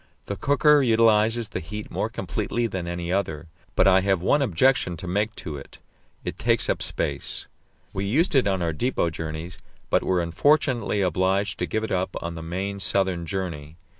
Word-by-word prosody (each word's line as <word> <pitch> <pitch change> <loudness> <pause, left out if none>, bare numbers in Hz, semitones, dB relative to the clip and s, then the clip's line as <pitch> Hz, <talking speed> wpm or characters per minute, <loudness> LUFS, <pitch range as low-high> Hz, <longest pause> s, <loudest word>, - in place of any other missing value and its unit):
This 100 - -5
cooker 145 +1 +5
utilizes 115 -1 +3
the 90 - -4
heat 105 +5 -7
more - - -1
completely 120 0 -2
than 95 -5 -3
any 85 0 -3
other; 80 -5 -2 0.3
but - - +4
I 95 0 +6
have 95 -1 +2
one 145 - +2
objection 110 -5 +2
to 90 - -8
make 105 +5 -1
to 75 -4 -6
it 70 - -12 0.5
it - - -5
takes - - +2
up - - -3
space. - - -3 0.5
We 95 +1 -2
used 150 - +2
it 135 -6 +4
on 95 -3 0
our 85 -1 0
depot 85 - 0
journeys, 80 +2 -6 0.3
but - - +4
were 90 -2 +1
unfortunately 120 - +2
obliged 95 +3 +1
to - - -1
give 110 - -1
it 110 - -3
up 95 0 -1
on 85 0 -5
the 80 - -7
main 95 +4 -4
southern 95 -3 0
journey. 80 -5 -4
95 Hz, 185 wpm, -25 LUFS, 85-110 Hz, 0.5 s, I